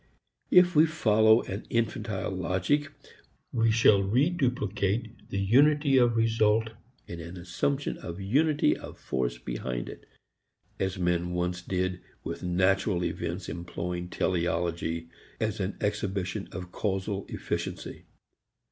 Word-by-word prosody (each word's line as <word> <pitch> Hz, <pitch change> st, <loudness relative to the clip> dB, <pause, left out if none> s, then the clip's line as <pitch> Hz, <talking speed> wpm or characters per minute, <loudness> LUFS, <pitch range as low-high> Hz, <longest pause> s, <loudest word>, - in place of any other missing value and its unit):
If 180 Hz, -1 st, +6 dB
we 155 Hz, +2 st, +7 dB
follow 110 Hz, -7 st, +4 dB
an 95 Hz, +3 st, -6 dB
infantile 110 Hz, -3 st, -1 dB
logic 95 Hz, -, 0 dB, 0.6 s
we 115 Hz, -1 st, +3 dB
shall 110 Hz, -3 st, +5 dB
reduplicate 115 Hz, -, 0 dB
the -, -, -3 dB
unity 140 Hz, +7 st, +4 dB
of 120 Hz, -2 st, +4 dB
result 110 Hz, 0 st, +2 dB, 0.3 s
in 85 Hz, -, -7 dB
an 85 Hz, +2 st, -8 dB
assumption 135 Hz, +11 st, -2 dB
of 85 Hz, +2 st, -7 dB
unity 145 Hz, +10 st, +2 dB
of -, -, -10 dB
force 60 Hz, -1 st, -2 dB
behind 60 Hz, 0 st, -4 dB
it -, -, -11 dB, 0.7 s
as 95 Hz, 0 st, -1 dB
men 90 Hz, -1 st, 0 dB
once 90 Hz, 0 st, -1 dB
did 90 Hz, 0 st, -2 dB, 0.2 s
with -, -, -5 dB
natural 95 Hz, +1 st, +1 dB
events 90 Hz, +2 st, -3 dB
employing 85 Hz, +1 st, -4 dB
teleology 85 Hz, -2 st, -1 dB, 0.3 s
as 110 Hz, -2 st, -1 dB
an 95 Hz, 0 st, -2 dB
exhibition 100 Hz, -3 st, -2 dB
of 90 Hz, 0 st, -7 dB
causal 95 Hz, 0 st, -2 dB
efficiency. -, -, -4 dB
95 Hz, 120 wpm, -28 LUFS, 90-115 Hz, 0.7 s, we